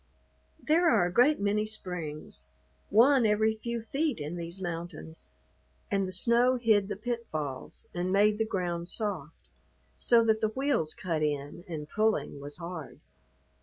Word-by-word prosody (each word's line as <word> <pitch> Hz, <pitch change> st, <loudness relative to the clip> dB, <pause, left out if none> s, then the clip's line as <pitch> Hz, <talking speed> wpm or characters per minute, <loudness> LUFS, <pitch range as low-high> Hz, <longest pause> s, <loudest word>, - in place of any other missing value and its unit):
There 330 Hz, +3 st, +3 dB
are 175 Hz, -, +4 dB
a 175 Hz, -, -2 dB
great 265 Hz, +8 st, +5 dB
many 205 Hz, +1 st, +1 dB
springs, 160 Hz, -, -6 dB, 0.4 s
one 250 Hz, +5 st, +6 dB
every 220 Hz, +1 st, +2 dB
few 235 Hz, +1 st, -4 dB
feet 280 Hz, -, -1 dB
in 150 Hz, +3 st, -4 dB
these 170 Hz, +2 st, -5 dB
mountains, 165 Hz, -, -6 dB, 0.6 s
and 195 Hz, -1 st, +1 dB
the -, -, -5 dB
snow 235 Hz, +6 st, +3 dB
hid 220 Hz, -5 st, +3 dB
the -, -, -3 dB
pitfalls 195 Hz, -, -5 dB
and 180 Hz, +1 st, -1 dB
made 210 Hz, +2 st, +4 dB
the -, -, +3 dB
ground 175 Hz, -3 st, -2 dB
soft, 185 Hz, -9 st, -5 dB, 0.5 s
so 235 Hz, -1 st, +4 dB
that 220 Hz, -1 st, +2 dB
the 220 Hz, -, +3 dB
wheels 245 Hz, -, 0 dB
cut 165 Hz, -4 st, -2 dB
in 145 Hz, +2 st, -2 dB
and 155 Hz, -4 st, -5 dB
pulling 215 Hz, -6 st, 0 dB
was 145 Hz, +1 st, -7 dB
hard. 170 Hz, -4 st, -7 dB
195 Hz, 150 wpm, -29 LUFS, 165-225 Hz, 0.6 s, one